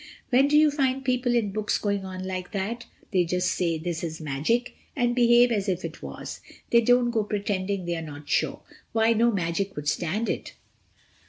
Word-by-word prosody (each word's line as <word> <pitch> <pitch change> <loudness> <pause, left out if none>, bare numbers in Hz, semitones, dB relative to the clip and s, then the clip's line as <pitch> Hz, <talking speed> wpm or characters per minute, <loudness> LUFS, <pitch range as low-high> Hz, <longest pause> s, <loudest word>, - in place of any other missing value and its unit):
When 265 +3 +5
do 295 +1 +4
you 305 -1 +6
find 270 -2 0
people 250 -1 +1
in 215 -4 +1
books 215 +1 0
going 200 -2 -1
on 185 0 -6
like 185 0 -5
that? 230 +4 -3 0.3
They 185 -2 +4
just 180 +2 0
say 170 -2 0
'This 170 +1 -4
is 160 -1 -4
magic!' 155 - -1 0.2
and 240 -3 +1
behave 240 0 +5
as 205 -3 0
if 185 -1 -1
it - - -7
was. - - -7 0.3
They 235 - +6
don't 245 +1 +3
go 225 -2 +1
pretending 200 -2 -2
they're 170 -1 -2
not 145 -2 -9
sure. - - 0 0.3
Why, 225 0 +4
no 235 +1 +3
magic 190 0 -2
would 150 0 -5
stand 185 +9 0
it." - - -3
205 Hz, 190 wpm, -26 LUFS, 180-240 Hz, 0.3 s, you